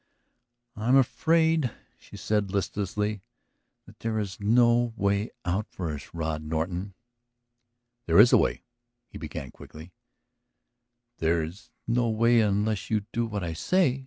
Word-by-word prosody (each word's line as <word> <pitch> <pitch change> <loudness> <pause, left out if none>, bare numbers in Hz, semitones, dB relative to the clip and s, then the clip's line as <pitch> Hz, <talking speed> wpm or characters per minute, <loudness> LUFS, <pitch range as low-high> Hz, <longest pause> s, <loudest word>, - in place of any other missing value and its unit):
"I 110 +1 -4
am 130 - +5
afraid," 160 +2 +3 0.3
she - - -13
said 105 -2 0
listlessly, 105 +1 -2 0.6
"that - - -17
there 115 -1 -2
is 100 -3 -4
no 120 +2 +3
way 100 +2 0 0.2
out 95 +4 -1
for 85 -4 -4
us, 70 - -9
Rod 80 -2 -3
Norton." 85 +5 -3 1.1
"There - - +3
is 120 +3 +8
a - - +8
way!" - - 0 0.5
he - - -10
began 75 -4 -7
quickly 80 +3 -13 1.3
"There 80 0 +1
is 85 +6 -9 0.2
no 120 0 +1
way 115 +2 +3
unless 105 0 0
you 105 -2 0
do 115 0 0
what 105 -3 -4
I 85 -1 -3
say. 135 - +1
105 Hz, 140 wpm, -27 LUFS, 85-115 Hz, 1.3 s, is